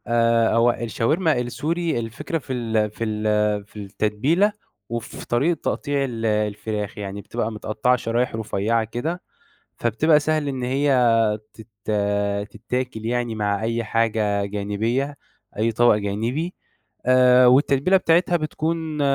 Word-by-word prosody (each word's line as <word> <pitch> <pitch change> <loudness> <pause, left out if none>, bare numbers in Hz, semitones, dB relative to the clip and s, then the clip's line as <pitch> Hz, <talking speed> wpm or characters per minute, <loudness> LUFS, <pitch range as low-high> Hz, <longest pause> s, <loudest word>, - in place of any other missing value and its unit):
آآ، 115 -1 +3
هو 115 +1 +4
الشاورما 135 - 0
السوري 160 +4 -2
الفكرة 115 +8 -4
في 135 -4 -6
ال 110 -3 0
في 115 - -5
ال 105 -1 0
في 105 - -27
التتبيلة 110 - +1 0.4
وفي 115 -1 -6
طريقة 145 +7 +1
تقطيع 145 -2 -1
ال 115 -4 -3
الفراخ، 105 -1 -2
يعني 100 0 -5
بتبقى 115 +1 -3
متقطّعة 110 +3 0
شرايح 120 0 -1
رفيّعة 110 +1 0
كده، 150 +11 -4 0.6
فبتبقى 150 +7 +3
سهل 155 -1 0
إن 130 -2 -3
هي 135 +3 +1 0.6
تت 110 0 -13 0.8
تتاكِل 115 0 -4
يعني، 120 -1 -1
مع 105 -1 -1
أي 115 +1 -1
حاجة 110 -3 0
جانبية، 105 +7 -2 0.4
أي 115 +2 +1
طَبَق 120 0 +4
جانبي 115 - -2 0.5
آآ، 125 0 +6
والتتبيلة 140 +7 +4
بتاعتها 175 0 +3
بتكون 155 0 -3
115 Hz, 125 wpm, -22 LUFS, 110-140 Hz, 0.8 s, آآ